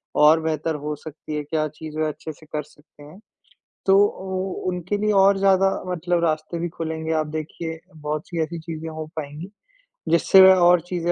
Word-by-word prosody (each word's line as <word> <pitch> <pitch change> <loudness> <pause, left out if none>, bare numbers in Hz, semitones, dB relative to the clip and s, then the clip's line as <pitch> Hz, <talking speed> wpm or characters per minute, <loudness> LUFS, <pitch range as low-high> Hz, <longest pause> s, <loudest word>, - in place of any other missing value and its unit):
और 150 +2 +6
बेहतर 160 0 -1
हो 150 +1 -4
सकती 155 0 -8
है, 150 - -2
क्या 155 +1 -1
चीज़ 155 +1 -9
वे 155 - +1
अच्छे 155 +1 -6
से 155 - -18
कर 150 0 -4
सकते 150 0 -20
हैं? 150 +6 -14 0.7
तो 195 0 +5
ओ 190 -1 -4 0.2
उनके 180 +3 -2
लिए 210 +1 +1
और 195 0 +5
ज़्यादा 195 0 +4 0.2
मतलब 175 -1 -1
रास्ते 155 +1 -1
भी 175 +1 -2
खुलेंगे, 160 -1 -4
आप 155 -1 0
देखिए 160 +1 -5 0.2
बहुत-सी 155 +2 -4
ऐसी 165 +1 -5
चीज़ें 160 0 -6
हो 155 0 -6
पाएँगी, 155 +4 -6 0.6
जिससे 170 +3 +6
वो 190 0 +9
और 175 0 +6
चीज़ें 175 -1 -1
160 Hz, 185 wpm, -23 LUFS, 155-180 Hz, 0.7 s, वो